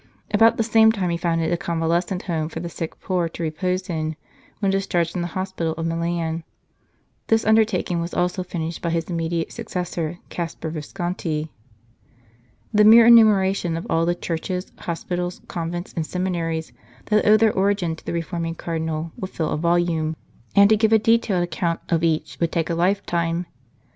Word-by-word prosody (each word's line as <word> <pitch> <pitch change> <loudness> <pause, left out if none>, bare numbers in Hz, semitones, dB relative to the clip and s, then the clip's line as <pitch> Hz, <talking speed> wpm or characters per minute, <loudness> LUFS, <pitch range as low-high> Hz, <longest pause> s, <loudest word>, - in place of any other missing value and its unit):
About 225 +2 +5
the 225 - +2
same 220 0 +5
time 190 -5 -1
he - - 0
founded 165 -1 0
a - - +1
convalescent 170 +1 -1
home 160 -3 -2
for 165 - -6
the 170 +1 -5
sick 165 -1 -6
poor 180 -3 -1
to 170 - -6
repose 180 +4 -2
in 155 -2 -2 0.4
when 195 -2 +1
dis 195 0 -1
charged 170 -1 +1
from 180 - -3
the 175 - -2
hospital 185 -4 -2
of 165 0 -4
Milan. 165 0 -2 0.8
This 225 0 +2
under 220 +1 +6
taking 180 -5 -2
was 170 +1 -4
also 180 +1 0
finished 170 -2 -4
by 170 - -1
his 165 +1 -2
immediate 165 0 -2
successor, 175 -2 -4
Caspar 165 -2 -4
Visconti. 160 -1 -3 1.2
The 210 0 +5
mere 225 +2 +9
enumeration 200 -7 +5
of 165 - -5
all 165 +1 +2
the 175 - +2
churches, 180 +2 -4
hospitals, 175 +1 -3
convents, 175 +1 -4
and 165 - -1
seminaries, 165 -3 -2 0.4
that 210 0 +4
owe 215 +1 +7
their 220 0 +3
origin 190 -4 +1
to - - -16
the - - -4
reforming 165 -1 -3
Cardinal 160 -1 -3
would 185 - -4
fill 160 -4 -2
a - - 0
volume, 170 -2 +1 0.4
and 200 0 +8
to 215 - +6
give 220 +1 +2
a 220 - +7
detailed 220 -4 +2
account 170 0 -1
of 165 -1 +1
each 155 -1 0
would 170 -1 0
take 165 0 -1
a - - +1
lifetime. 170 -1 0
175 Hz, 180 wpm, -23 LUFS, 165-190 Hz, 1.2 s, mere